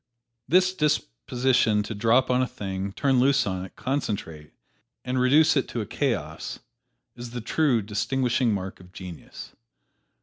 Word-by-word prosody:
This 185 +5 +4
disposition 125 - +1
to 110 - -5
drop 115 +5 +3
on 125 0 +3
a 130 - +1
thing, 95 -2 -5
turn 135 +1 +2
loose 135 +2 +3
on 95 -2 -3
it, 95 - -11
concentrate, 100 - -3 0.5
and 130 0 -1
reduce 150 +6 +5
it 135 - +1
to 120 - -3
a - - -4
chaos, 115 - -3 0.6
is 120 0 -8
the 120 +1 -5
true 120 -1 +1
distinguishing 120 +3 0
mark 95 -2 -4
of 90 0 -16
genius. 90 -5 -9
120 Hz, 145 wpm, -25 LUFS, 100-130 Hz, 0.6 s, reduce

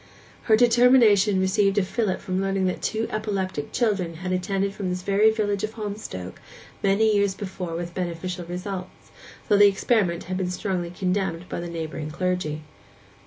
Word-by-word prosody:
Her 220 - +5
determination 230 -4 +5
received 195 +1 +2
a 205 - +4
fillip 200 0 -1
from 185 0 -2
learning 195 -1 0
that 185 - -1
two 220 +1 -1
epileptic 195 -8 -3
children 200 -8 0
had 180 +3 -5
attended 195 +2 -1
from 195 -3 -3
this 180 0 -3
very 200 +3 +4
village 205 -2 -1
of 215 +1 -2
Holmstoke 205 - -6 0.4
many 210 +2 +3
years 200 -1 +2
before 185 -4 -5
with 170 0 -5
beneficial 180 0 -4
results, 180 +2 -7 0.4
though 205 - +4
the 205 0 +8
experiment 195 -3 +1
had 185 +1 -4
been 185 -1 -1
strongly 180 -1 -2
condemned 180 -1 -2
by - - -4
the 170 0 -5
neighbouring 160 -2 -5
clergy. 170 -2 -2
190 Hz, 165 wpm, -24 LUFS, 180-205 Hz, 0.4 s, the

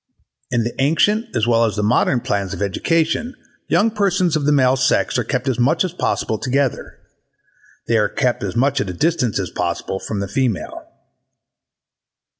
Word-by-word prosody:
In 120 -2 0
the 120 +1 -3
antient 205 - +2
as 110 - +2
well 115 -1 +3
as 110 -2 0
the 105 - -1
modern 120 +3 +2
plans 100 -3 -2
of - - -8
education 165 - 0 0.3
young 225 +2 +2
persons 195 -5 +1
of 150 -2 -1
the - - +4
male 130 -2 +4
sex 130 0 +1
are - - 0
kept 125 +3 -2
as 130 -3 0
much 150 +9 +2
as 180 - -5
possible 110 -10 -1
together: 135 -1 -1 0.9
they 115 - +2
are 105 -1 +1
kept 125 -3 -1
as 95 -3 -4
much 135 +3 +2
at 100 - -3
a - - -4
distance 125 - 0
as 95 - -4
possible 90 +2 -3
from 105 0 -4
the 100 - -3
female. 115 -1 -2
125 Hz, 180 wpm, -19 LUFS, 105-160 Hz, 0.9 s, the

